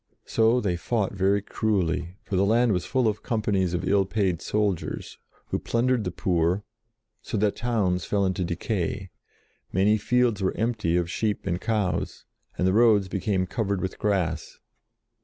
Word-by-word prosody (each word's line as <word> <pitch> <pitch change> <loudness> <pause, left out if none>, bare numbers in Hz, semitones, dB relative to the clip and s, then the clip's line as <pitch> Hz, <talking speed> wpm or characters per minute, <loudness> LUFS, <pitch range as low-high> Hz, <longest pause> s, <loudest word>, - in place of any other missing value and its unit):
So 115 +2 +3
they 95 -7 -1
fought 105 +2 -1
very 100 +1 +1
cruelly, 90 -5 -1
for 100 - -4
the 95 - +3
land 115 +3 +3
was 90 - -2
full 125 -2 +2
of 105 -1 -1
companies 100 -6 0
of 90 - -2
ill 100 0 +4
paid 95 -4 0
soldiers, 105 -5 -2 0.3
who - - -1
plundered 120 -1 +1
the 90 - -2
poor, 90 +2 0 0.6
so - - -4
that 105 0 +1
towns 100 -7 0
fell 100 +2 +1
into 95 0 -1
decay, 95 +1 -2 0.6
many 100 +4 +3
fields 120 -2 +2
were 95 - 0
empty 110 -7 0
of 85 -1 0
sheep 105 -2 -1
and 90 -2 -1
cows, 105 -6 -1 0.3
and 90 - +1
the 95 - +3
roads 105 -4 +4
became 95 -1 0
covered 100 0 -1
with 95 0 -4
grass. 90 -7 -1
100 Hz, 160 wpm, -26 LUFS, 90-110 Hz, 0.6 s, ill